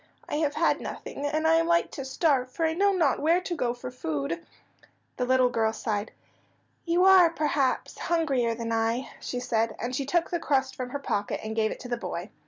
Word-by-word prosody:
"I -, -, -2 dB
have 300 Hz, -2 st, 0 dB
had 330 Hz, -, +2 dB
nothing, 285 Hz, -, -5 dB
and 310 Hz, +2 st, -1 dB
I 325 Hz, 0 st, +5 dB
am 330 Hz, 0 st, +2 dB
like 340 Hz, 0 st, +2 dB
to 275 Hz, -, -6 dB
starve, 265 Hz, -2 st, +1 dB
for 330 Hz, -, -1 dB
I 320 Hz, -, +1 dB
know 400 Hz, +4 st, +3 dB
not 330 Hz, -8 st, +2 dB
where 330 Hz, +4 st, +3 dB
to 360 Hz, -1 st, -3 dB
go 245 Hz, -6 st, 0 dB
for 250 Hz, +1 st, -7 dB
food." 160 Hz, -, -3 dB, 0.7 s
The 250 Hz, -, 0 dB
little 255 Hz, -1 st, +4 dB
girl 225 Hz, -2 st, +1 dB
sighed. 210 Hz, -1 st, -3 dB, 0.7 s
"You 345 Hz, +2 st, +3 dB
are, 375 Hz, -3 st, +8 dB
perhaps, 295 Hz, -5 st, -1 dB
hungrier 275 Hz, -9 st, +1 dB
than 230 Hz, 0 st, -4 dB
I," 225 Hz, +3 st, 0 dB
she 250 Hz, -, -4 dB
said, 230 Hz, -2 st, 0 dB
and 250 Hz, +2 st, -3 dB
she 270 Hz, 0 st, -2 dB
took 340 Hz, +3 st, +1 dB
the 345 Hz, -, 0 dB
crust 270 Hz, -4 st, 0 dB
from 255 Hz, -1 st, -5 dB
her 285 Hz, -, -3 dB
pocket 205 Hz, -7 st, -2 dB
and 220 Hz, 0 st, -4 dB
gave 220 Hz, -1 st, +2 dB
it -, -, -6 dB
to -, -, -7 dB
the 240 Hz, -1 st, -2 dB
boy. 180 Hz, -2 st, -5 dB
265 Hz, 215 wpm, -27 LUFS, 230-325 Hz, 0.7 s, are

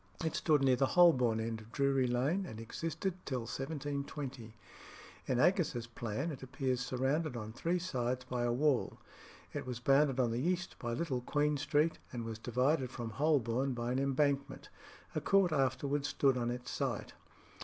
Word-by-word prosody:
It 160 Hz, -, 0 dB
stood 150 Hz, -4 st, +2 dB
near 130 Hz, -1 st, +5 dB
the 135 Hz, -, +3 dB
Holborn 125 Hz, -10 st, +6 dB
end 110 Hz, 0 st, -3 dB
of 110 Hz, +1 st, -15 dB
Drury 135 Hz, -1 st, +2 dB
Lane, 140 Hz, +11 st, 0 dB
and 110 Hz, -, -8 dB
existed 165 Hz, -, -3 dB
till 130 Hz, -3 st, -2 dB
1720. 140 Hz, -2 st, -5 dB, 0.7 s
In 130 Hz, -, +1 dB
Aggas's 155 Hz, -8 st, +2 dB
Plan 120 Hz, +6 st, -3 dB
it 135 Hz, -, -8 dB
appears 130 Hz, -1 st, -2 dB
surrounded 130 Hz, +3 st, -1 dB
on 110 Hz, -1 st, -6 dB
three 170 Hz, +8 st, 0 dB
sides 125 Hz, -8 st, -2 dB
by 125 Hz, -1 st, -2 dB
a 120 Hz, 0 st, +1 dB
wall. 140 Hz, +1 st, +1 dB, 0.6 s
It -, -, -4 dB
was 125 Hz, -1 st, -4 dB
bounded 135 Hz, +1 st, +3 dB
on 120 Hz, -3 st, +2 dB
the 120 Hz, +2 st, -1 dB
east 175 Hz, +3 st, -1 dB
by 120 Hz, -1 st, -3 dB
Little 135 Hz, -3 st, -1 dB
Queen 150 Hz, +3 st, +1 dB
Street, 150 Hz, +2 st, +1 dB
and 120 Hz, -2 st, -4 dB
was 110 Hz, -1 st, -5 dB
divided 130 Hz, +4 st, +1 dB
from 120 Hz, -3 st, -5 dB
Holborn 135 Hz, -2 st, +1 dB
by 120 Hz, 0 st, -2 dB
an 130 Hz, -, +1 dB
embankment. 140 Hz, +1 st, 0 dB, 0.4 s
A -, -, -1 dB
court 195 Hz, -3 st, +4 dB
afterwards 140 Hz, 0 st, 0 dB
stood 135 Hz, -2 st, +2 dB
on 120 Hz, -1 st, -1 dB
its 125 Hz, 0 st, -5 dB
site. -, -, -2 dB
135 Hz, 170 wpm, -34 LUFS, 120-150 Hz, 0.7 s, Holborn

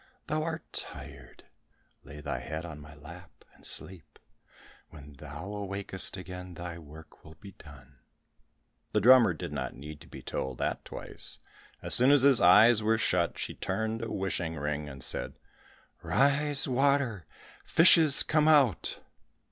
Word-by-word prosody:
Thou 155 Hz, 0 st, -2 dB
art 160 Hz, 0 st, -4 dB
tired, 70 Hz, -2 st, -9 dB, 0.6 s
lay 70 Hz, +2 st, -11 dB
thy 65 Hz, -, -4 dB
head 80 Hz, +6 st, -6 dB
in 80 Hz, -3 st, -9 dB
my 75 Hz, +1 st, -13 dB
lap, 85 Hz, +5 st, -14 dB
and -, -, -23 dB
sleep. 85 Hz, -4 st, -5 dB, 0.7 s
When 75 Hz, -2 st, -13 dB
thou 75 Hz, +8 st, -9 dB
awakest 100 Hz, -1 st, -4 dB
again, 90 Hz, -1 st, -9 dB
thy 85 Hz, 0 st, -7 dB
work 80 Hz, 0 st, -15 dB
will 80 Hz, 0 st, -14 dB
be 100 Hz, -, -13 dB
done." 70 Hz, -6 st, -17 dB, 0.9 s
The 105 Hz, -, +3 dB
drummer 120 Hz, -3 st, +6 dB
did 75 Hz, -, -7 dB
not 65 Hz, -3 st, -5 dB
need 75 Hz, +2 st, -10 dB
to -, -, -14 dB
be -, -, -12 dB
told 65 Hz, -2 st, -4 dB
that -, -, -3 dB
twice. -, -, -7 dB, 0.5 s
As -, -, +2 dB
soon 125 Hz, +2 st, +5 dB
as 145 Hz, -2 st, +5 dB
his 140 Hz, -3 st, +5 dB
eyes 110 Hz, +6 st, +6 dB
were 110 Hz, +1 st, +1 dB
shut, 110 Hz, -, 0 dB
she -, -, -5 dB
turned 110 Hz, 0 st, -3 dB
a -, -, -5 dB
wishing 90 Hz, -4 st, -3 dB
ring 75 Hz, 0 st, -4 dB
and 65 Hz, -2 st, -9 dB
said, -, -, -3 dB, 0.6 s
"Rise, 140 Hz, +1 st, +1 dB
water. 130 Hz, -, 0 dB, 0.4 s
Fishes, 160 Hz, -3 st, +6 dB
come 155 Hz, -1 st, +1 dB
out." 140 Hz, -, +2 dB
90 Hz, 150 wpm, -29 LUFS, 75-125 Hz, 0.9 s, drummer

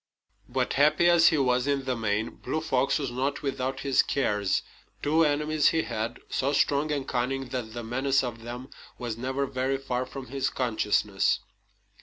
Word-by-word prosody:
But 125 Hz, 0 st, 0 dB
happy 150 Hz, +4 st, +4 dB
as 170 Hz, -1 st, +6 dB
he 160 Hz, -, +4 dB
was 125 Hz, -1 st, +2 dB
in 140 Hz, -1 st, 0 dB
the 130 Hz, -1 st, 0 dB
main, 110 Hz, -1 st, -1 dB
Blue 155 Hz, -, -3 dB
Fox 135 Hz, -4 st, +1 dB
was 135 Hz, -4 st, -3 dB
not 135 Hz, +4 st, -2 dB
without 135 Hz, -1 st, -2 dB
his 135 Hz, -2 st, +4 dB
cares. 105 Hz, -8 st, 0 dB, 0.4 s
Two 160 Hz, +3 st, +3 dB
enemies 150 Hz, 0 st, +2 dB
he 160 Hz, -1 st, +1 dB
had, 110 Hz, +1 st, -3 dB
so 140 Hz, +2 st, 0 dB
strong 145 Hz, +2 st, +2 dB
and 140 Hz, -2 st, -2 dB
cunning 130 Hz, +1 st, -1 dB
that 120 Hz, -3 st, -4 dB
the 120 Hz, -, -4 dB
menace 135 Hz, +4 st, +1 dB
of 120 Hz, -2 st, -5 dB
them 120 Hz, +3 st, -7 dB, 0.3 s
was 120 Hz, -3 st, -4 dB
never 130 Hz, +4 st, -2 dB
very 135 Hz, 0 st, -1 dB
far 130 Hz, -2 st, -3 dB
from 135 Hz, 0 st, -7 dB
his 135 Hz, +1 st, -1 dB
consciousness. 105 Hz, -5 st, +1 dB
130 Hz, 175 wpm, -27 LUFS, 120-140 Hz, 0.4 s, as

